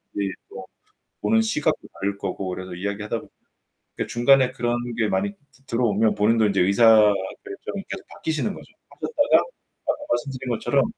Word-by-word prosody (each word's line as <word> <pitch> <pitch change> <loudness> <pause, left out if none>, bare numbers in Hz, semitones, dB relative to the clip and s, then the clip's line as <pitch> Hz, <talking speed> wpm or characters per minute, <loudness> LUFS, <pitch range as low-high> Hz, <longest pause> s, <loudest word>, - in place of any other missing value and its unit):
이제 100 -1 -1 0.2
또 - - -9 0.6
보는 110 +2 +3
시각도 110 0 0
다를 100 +1 -3
거고 95 -1 -4
그래서 95 0 -5
이야기하다 100 +4 -3
보면 - - -13 0.7
그 - - -2
중간에 130 +2 +4
그런 120 0 -1 0.2
게 110 -2 +2
많이 100 +1 0 0.3
들어오면 110 -2 +2
본인도 110 +1 +3
이제 100 - +1
의사 100 +6 +3 0.6
결정이 395 - -6
계속 - - -6
바뀌시는 160 +6 -2
거죠. - - -13 0.2
하셨다가 470 - +2 0.4
아까 - - +1
말씀드린 135 -4 -2
것처럼 135 +4 +2
110 Hz, 360 characters per minute, -24 LUFS, 100-130 Hz, 0.7 s, 중간에